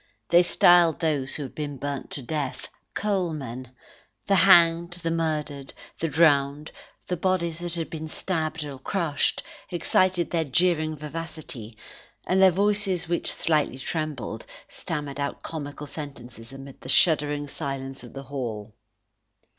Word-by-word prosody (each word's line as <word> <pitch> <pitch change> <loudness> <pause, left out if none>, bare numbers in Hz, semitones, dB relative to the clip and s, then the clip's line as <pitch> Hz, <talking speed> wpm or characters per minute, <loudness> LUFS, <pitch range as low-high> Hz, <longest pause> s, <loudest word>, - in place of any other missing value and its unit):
They 170 +1 +7
styled 175 -2 +5
those 145 -5 0
who 150 - -3
had 130 - -8
been 145 -2 -4
burnt 140 +1 -4
to 140 - -2
death, 140 +1 -3 0.3
coalmen; 155 - -2 0.6
the 200 - +2
hanged, 170 -2 +6
the 170 -2 -3
murdered, 150 -4 -2 0.2
the 165 - 0
drowned, 145 -2 +3 0.3
the 180 - -1
bodies 170 -2 0
that 175 0 -1
had 165 -2 -3
been 160 -1 -5
stabbed 160 -2 -3
or 140 -2 -7
crushed, 165 0 0 0.3
excited 180 +1 +1
their 165 -2 +1
jeering 155 +1 +2
vivacity, 150 -7 -7 0.5
and 190 +1 +2
their 190 - +9
voices, 195 -1 +1
which 170 +1 -1
slightly 150 -5 +1
trembled, 150 -4 -4 0.2
stammered 145 -3 -5
out 140 0 -3
comical 150 -2 -6
sentences 125 -6 -9
amid 135 0 -11
the 130 - -6
shuddering 145 -1 +3
silence 135 -2 -5
of - - -12
the 135 - -7
hall. 115 -6 -5
155 Hz, 140 wpm, -26 LUFS, 140-170 Hz, 0.6 s, their